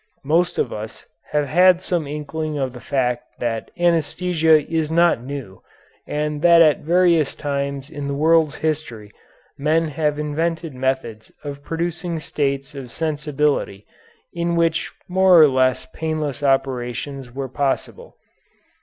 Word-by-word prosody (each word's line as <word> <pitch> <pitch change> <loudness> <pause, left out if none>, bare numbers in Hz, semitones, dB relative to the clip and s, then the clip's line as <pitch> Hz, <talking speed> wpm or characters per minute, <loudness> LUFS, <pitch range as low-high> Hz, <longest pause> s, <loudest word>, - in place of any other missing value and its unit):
Most 170 +5 +2
of 120 - -1
us 110 +1 -8 0.2
have 150 -1 +1
had 180 +5 +5
some 175 -5 -1
inkling 150 +1 -4
of 130 -3 -2
the 125 - -9
fact 125 -1 -2
that 115 -2 -3
anæsthesia 165 -2 +2
is 160 -2 -1
not 170 -5 +3
new, 130 -7 -7 0.5
and 150 0 -2
that 170 0 +6
at 155 -3 +5
various 170 -2 +2
times 140 -1 -3
in 145 -2 -5
the 140 - -2
world's 160 0 +3
history 145 -10 -3 0.5
men 155 +3 +1
have 150 0 -1
invented 160 +1 -2
methods 130 -4 -3
of 140 -1 -6
producing 170 +2 -3
states 140 -2 -2
of 135 -4 -8
sensibility 150 -9 -1 0.5
in 170 0 -1
which 165 -1 +1 0.2
more 185 -1 +5
or 155 - +9
less 130 -1 +1
painless 155 -3 -3
operations 135 -1 -1
were 135 +2 -4
possible. 135 +1 -3
150 Hz, 135 wpm, -21 LUFS, 135-165 Hz, 0.5 s, or